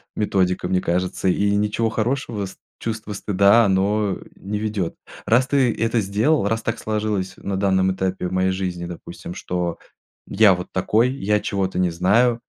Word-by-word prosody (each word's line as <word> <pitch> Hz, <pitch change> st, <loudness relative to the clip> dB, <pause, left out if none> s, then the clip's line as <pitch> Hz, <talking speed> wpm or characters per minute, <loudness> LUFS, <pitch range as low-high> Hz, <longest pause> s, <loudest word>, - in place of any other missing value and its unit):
методика, 90 Hz, -4 st, 0 dB
мне 90 Hz, 0 st, +1 dB
кажется, 90 Hz, +2 st, -1 dB
и 100 Hz, +2 st, +2 dB
ничего 105 Hz, +2 st, +1 dB
хорошего 115 Hz, -2 st, -2 dB
ст -, -, -13 dB, 0.2 s
чувство 110 Hz, -2 st, -4 dB
стыда 100 Hz, +3 st, +4 dB
оно 100 Hz, +1 st, +1 dB, 0.2 s
не 105 Hz, +2 st, -4 dB
ведёт. 105 Hz, -5 st, -2 dB, 0.3 s
Раз 125 Hz, +3 st, +3 dB
ты 130 Hz, -4 st, +2 dB
это 115 Hz, 0 st, 0 dB
сделал, 105 Hz, +5 st, +1 dB
раз 115 Hz, 0 st, -1 dB
так 115 Hz, -, -2 dB
сложилось 105 Hz, -3 st, -2 dB
на 100 Hz, -1 st, -4 dB
данном 95 Hz, -1 st, +2 dB
этапе 95 Hz, -1 st, -2 dB
в 90 Hz, -, -6 dB
моей 95 Hz, 0 st, +2 dB
жизни, 90 Hz, -2 st, -3 dB
допустим, 85 Hz, 0 st, -8 dB
что 90 Hz, -1 st, -3 dB, 0.5 s
я 100 Hz, -1 st, +5 dB
вот 90 Hz, -, -6 dB
такой, 110 Hz, +6 st, +2 dB
я 105 Hz, -5 st, 0 dB
чего-то 95 Hz, -2 st, -2 dB
не 90 Hz, -2 st, +2 dB
знаю, 115 Hz, +8 st, +2 dB
100 Hz, 165 wpm, -22 LUFS, 95-110 Hz, 0.5 s, я